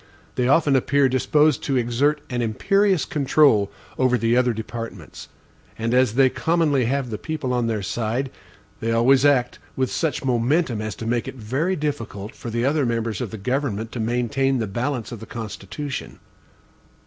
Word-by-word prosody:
They 125 - 0
often 140 0 +4
appear 140 +1 +3
disposed 150 +4 +2
to 135 -2 +1
exert 130 +5 +1
an 120 -1 -1
imperious 190 - +2
control 140 -8 +3 0.3
over 130 -1 +3
the 115 0 +1
other 125 0 +3
departments; 115 +1 -7 0.5
and 115 +1 -1
as 125 -3 +3
they 135 0 +6
commonly 150 -2 +1
have 130 0 -1
the 105 - -4
people 155 -6 -3
on 120 -2 +1
their 110 -3 -2
side, 120 +6 -2 0.5
they 115 +1 -1
always 130 +4 +4
act 130 -4 +2 0.2
with 130 -1 0
such 150 -5 -1
momentum 125 0 +1
as 110 -3 -4
to 115 - -7
make 120 +1 -1
it - - -6
very 135 - -1
difficult 115 - -4
for 120 - -8
the 115 +2 -1
other 145 +2 +2
members 115 -3 -1
of 120 - -3
the 110 - -7
government 115 0 -2
to 120 - -5
maintain 125 +4 0
the 115 - -1
balance 120 +4 -3
of 120 - -7
the 110 - -10
Constitution. 120 +5 -6
125 Hz, 170 wpm, -23 LUFS, 115-140 Hz, 0.5 s, they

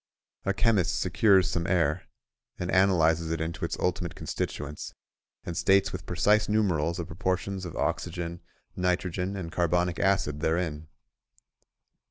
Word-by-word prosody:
A 100 - +1
chemist 105 -5 +2
secures 95 -4 +4
some 85 -2 -1
air, 85 -2 +1 0.5
and 90 +1 -3
analyses 85 -4 +3
it 80 -1 -1
into 80 +1 -4
its - - -2
ultimate 90 -1 -1
constituents, 75 0 -5 0.5
and 85 - -5
states 95 +3 +3
with 90 0 -7
precise 105 +4 +2
numerals 85 -6 +1
the 85 - -3
proportions 95 +2 -2
of 85 - -7
oxygen, 85 0 -2 0.3
nitrogen, 90 +1 -1
and 85 -3 -5
carbonic 85 0 +1
acid 95 -7 +1
therein. 80 -1 -1
90 Hz, 130 wpm, -28 LUFS, 85-95 Hz, 0.5 s, secures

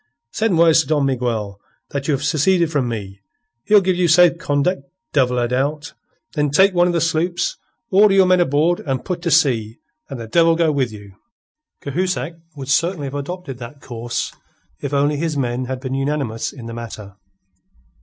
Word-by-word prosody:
"Send 220 -6 0
word 165 -1 +5
to 160 - +2
Don 150 -3 +1
Miguel 115 -6 -2 0.3
that 140 -2 -3
you 155 - +2
have 135 - -5
seceded 160 +3 +2
from 140 -5 0
me. 100 -4 -6 0.5
He'll 210 -1 +6
give 185 -1 0
you 180 -1 +2
safe 170 +1 +5
conduct, 145 0 0 0.3
devil 125 -3 +2
a 120 -1 +1
doubt. 145 +5 -2 0.4
Then 150 -2 0
take 190 +7 +4
one 175 0 +3
of 175 - 0
the 170 - +1
sloops, 165 +2 0 0.3
order 200 +1 +5
your 190 -1 +6
men 185 0 +4
aboard 165 +2 +2
and 135 -3 -3
put 180 -2 -3
to 170 - -1
sea, 125 -8 +2 0.3
and 135 - -6
the 115 - -6
devil 165 +8 +3
go 165 -2 +2
with 135 -5 0
you." 100 -2 -12 0.7
Cahusac 160 -1 -2 0.2
would 135 -2 -8
certainly 165 +2 +1
have 135 - -6
adopted 145 -2 -6
that 120 +4 -9
course 120 -2 -4 0.5
if 140 - -4
only 145 +1 +1
his 160 -1 -2
men 125 -1 -1
had 130 0 -4
been 130 0 -5
unanimous 135 -4 -2
in 125 -5 -11
the 115 - -7
matter. 110 -4 -8
145 Hz, 185 wpm, -20 LUFS, 125-170 Hz, 0.7 s, He'll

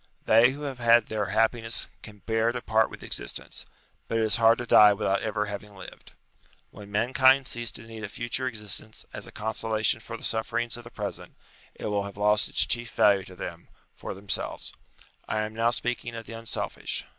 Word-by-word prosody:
They 115 +3 +6
who 145 +2 -8
have 135 -3 -5
had 120 -1 +5
their 105 -2 -1
happiness 115 0 +1
can 105 -2 -13
bear 115 +1 +1
to 120 - -4
part 110 -1 +2
with - - -11
existence: - - -3 0.4
but 115 - -1
it 115 - +2
is 110 - +2
hard 115 0 +5
to 120 - -4
die 105 -3 +7
without 100 -1 0
ever 110 -1 -2
I/A/ 105 - -6
C - - -5
having 100 0 -8
lived. 95 - -12 0.6
When 100 -1 -12
mankind 130 +5 +4
cease 120 -2 +1
to - - -7
need 115 -1 -9
a 105 - -4
future 120 +4 -2
existence 110 -2 -2
as - - -7
a - - -11
consolation 110 0 0
for 115 +1 -8
the - - -15
sufferings 115 +1 -1
of 120 0 -9
the - - -9
present, 105 -3 -6 0.4
it - - -8
will 100 -1 -1
have 100 0 -9
lost 105 +1 +3
its - - +5
chief 120 0 0
value 100 -2 +3
to 90 - -12
them, - - -7 0.3
for - - -7
themselves. 100 +1 -2 0.5
I 110 - -1
am 110 0 -4
now 115 +1 +2
speaking 120 -1 -2
of 115 -1 -7
the - - -9
unselfish. 115 0 -4
110 Hz, 205 wpm, -27 LUFS, 105-120 Hz, 0.6 s, die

